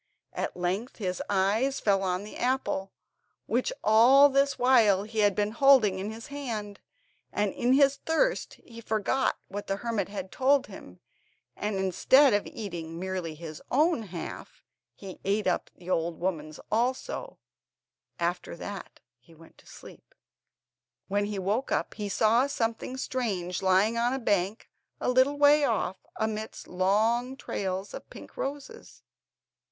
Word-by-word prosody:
At - - -4
length 190 +8 -2
his 185 -4 -3
eyes 205 +8 +1
fell 195 -2 +2
on 185 0 -1
the 210 - -10
apple, 245 -6 -1 0.5
which 480 - 0
all 255 +6 +7
this 275 +1 +2
while 225 -6 +4
he 220 +1 -5
had 205 -2 +3
been 210 +1 0
holding 230 -6 +5
in 200 +2 -3
his 225 +1 -8
hand, 230 -8 -5 0.5
and 205 -1 0
in 245 +1 +1
his 275 0 +4
thirst - - 0
he 230 -1 -13
forgot 220 +4 0
what 205 +1 -6
the 195 - 0
hermit 210 -2 -2
had 190 -2 -6
told 275 +1 +3
him, 90 - -12 0.6
and 210 0 -3
instead 205 +8 +4
of 205 - +1
eating 170 -6 -6
merely 185 -3 -4
his 155 -1 -9
own 305 +1 +2
half, 180 -6 -8 0.3
he 195 -2 -10
ate 205 +2 0
up - - 0
the 180 +1 -8
old 165 -1 -1
woman's 155 -4 -3
also; 260 - -1 0.8
after 175 +1 -2
that 200 +3 -8 0.2
he 145 +7 -20
went 165 +1 -18
to - - -21
sleep. - - -14 0.9
When 205 +1 +1
he 205 -1 -4
woke 205 +7 -1
up - - -1
he 205 -2 -5
saw 225 +6 +3
something 235 -1 -2
strange 195 -10 -2
lying 195 +5 +3
on 240 +2 +1
a - - -1
bank 205 -2 0 0.3
a - - -1
little 260 +3 +3
way 290 +1 +6
off, 205 -7 -1
amidst 220 0 -4
long 220 +8 +1
trails 190 -4 -4
of - - -9
pink - - -12
roses. 290 +12 -7
210 Hz, 150 wpm, -28 LUFS, 190-255 Hz, 0.9 s, all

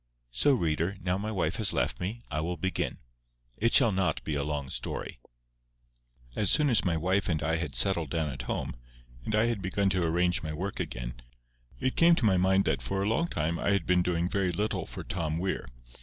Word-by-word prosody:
So, 145 - +3
reader, 85 - 0
now 90 0 -1
my 110 +2 -3
wife 90 -5 -1
has 105 -5 +1
left - - -1
me, 110 +7 -4
I 75 +1 -1
will 85 +2 -3
begin. 95 +4 -2 0.6
It 115 +2 +2
shall 115 -5 +7
not 95 -1 0
be 80 - -3
a 70 0 0
long 75 -2 -3
story. - - -4 1.2
As 105 -3 +1
soon 150 -3 +4
as 115 - +3
my 85 -3 +1
wife 95 +5 0
and 80 -4 0
I 80 +2 +1
had 80 -4 -4
settled 85 -6 +2
down 80 -3 -1
at 65 - -6
home, - - -3 0.5
and 110 - 0
I 110 +1 +4
had 115 -4 -1
begun 95 +1 0
to 90 -2 +1
arrange 90 +2 +1
my 80 -1 -4
work 95 +6 -4
again, - - -5 0.6
it 130 - -1
came 170 0 +6
to 130 - 0
my 95 -3 +4
mind 95 +2 +3
that - - 0
for 95 0 -2
a - - 0
long 115 +11 +1
time 80 - -2
I - - 0
had 100 -5 0
been 90 +2 +3
doing 85 -1 0
very 95 -1 0
little 105 +5 -2
for - - -7
Tom 80 -1 -2
Weir. 95 +3 -2
90 Hz, 215 wpm, -29 LUFS, 80-100 Hz, 1.2 s, shall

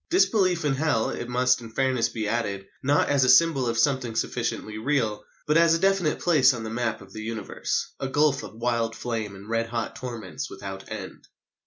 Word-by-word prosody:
Disbelief 190 - +3
in 145 - +2
Hell, 135 -5 +1
it 120 - -5
must 125 0 +2
in 115 - -9
fairness 130 0 +1
be 110 -2 -3
added, 100 -3 -2 0.2
not 140 +2 +2
as 140 -2 +3
a 130 - +3
symbol 135 -1 +5
of 115 0 -1
something 130 -3 +1
sufficiently 110 -1 -2
real, 115 -4 0 0.2
but 150 +2 +3
as 165 -1 +5
a - - -1
definite 195 -4 +2
place 140 -7 +4
on 115 - -6
the 110 - -5
map 120 -2 -2
of 95 0 -14
the 110 - -6
Universe, 110 -2 -3
a 135 - -2
gulf 145 0 +2
of - - -10
wild 115 -1 -1
flame 115 -3 -4
and 100 +2 -12
red 115 0 0
hot 115 -1 -3
torments 115 -7 -6
without 95 0 -8
end. 105 -4 -8
120 Hz, 200 wpm, -26 LUFS, 110-145 Hz, 0.2 s, symbol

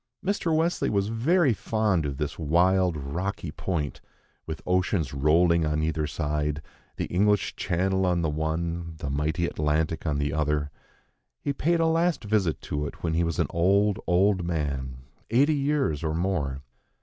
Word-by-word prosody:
Mr. 195 -4 0
Wesley 165 +2 +1
was 100 0 0
very 135 +5 +3
fond 105 -7 0
of 70 -2 -4
this 75 +2 -3
wild, 90 +2 +3
rocky 85 +4 -4
point, 75 -3 -3 0.5
with 80 -1 -4
oceans 90 -5 0
rolling 85 +4 +3
on 75 0 0
either 80 -1 -1
side, 75 0 -2 0.3
the - - -1
English 105 +2 +1
Channel 95 +1 0
on 90 -1 +1
the - - +2
one, 85 +2 -2
the 70 -2 -4
mighty 75 +4 0
Atlantic 80 +1 -1
on 75 -2 0
the 70 -1 -1
other. 75 -1 0 0.7
He 140 - -2
paid 170 +4 +1
a 165 - +3
last 165 -2 +1
visit 105 -6 +1
to 75 0 -3
it - - -11
when 80 -2 0
he 85 +1 +2
was 85 -2 -2
an - - +2
old, 100 +4 +2
old 95 +1 +3
man, 70 -6 -3 0.3
eighty 140 +7 +4
years 140 - 0
or 80 -1 -1
more. 75 -7 -1
85 Hz, 160 wpm, -26 LUFS, 75-100 Hz, 0.7 s, eighty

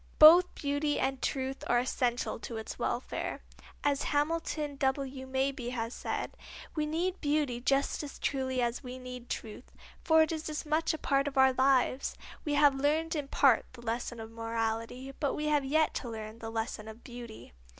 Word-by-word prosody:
Both 340 +4 +9
beauty 290 +1 0
and 265 0 0
truth 265 -1 -2
are 240 - +3
essential 245 -1 0
to 225 +1 -6
its 220 - -6
welfare. - - -2 0.4
As 285 -1 +2
Hamilton 300 -1 0
W. 265 -1 -1
Mabie 265 -2 -1
has 230 0 -3
said: - - -3 0.4
"We 305 -1 0
need 350 +4 -1
beauty 290 -5 0
just 275 +2 +1
as 290 -2 -7
truly 260 -2 0
as 240 0 -1
we 250 0 -6
need 250 -1 -8
truth, 225 +2 -6 0.3
for 320 -1 +6
it 315 - -1
is 315 -1 -3
as 305 0 -4
much 315 +1 +1
a - - -6
part 275 -1 +1
of 280 -1 -4
our 265 0 +6
lives. 260 0 +2 0.3
We 295 -1 0
have 290 -1 +6
learned 305 +4 +1
in 290 -2 -2
part 270 -4 +4
the 240 -2 -12
lesson 235 +1 -3
of 220 0 -8
morality, 230 +3 -3
but 285 -3 0
we 300 - -2
have 295 -2 +3
yet 315 +3 +2
to 245 - -6
learn 220 0 -7
the 225 - -5
lesson 225 -1 -3
of 220 +2 -10
beauty." 240 - -10
265 Hz, 180 wpm, -31 LUFS, 240-295 Hz, 0.4 s, Both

